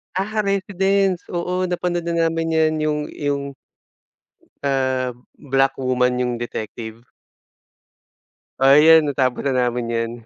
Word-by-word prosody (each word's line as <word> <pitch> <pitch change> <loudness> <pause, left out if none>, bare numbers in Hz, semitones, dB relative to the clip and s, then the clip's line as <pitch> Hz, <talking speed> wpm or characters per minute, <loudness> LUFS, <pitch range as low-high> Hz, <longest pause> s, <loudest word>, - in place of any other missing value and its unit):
Aha, 215 +3 -2
Residence. 195 -1 0
Oo. 180 +1 -2
Napanood 175 -1 -2
na 165 -1 +1
namin 165 0 -2
yan, 155 0 +3
yung 150 -1 0
yung 140 -1 -3 1.1
ah, 130 -2 0 0.2
black 135 -1 0
woman 125 -1 +1
yung 125 -1 -1
detective? 110 0 -7 1.5
Oo 135 +1 +6
yan, 160 +1 +7
natapos 130 -2 -1
na 135 - +1 0.2
namin 120 0 -3
yan. 115 0 -1
145 Hz, 115 wpm, -21 LUFS, 130-175 Hz, 1.5 s, yan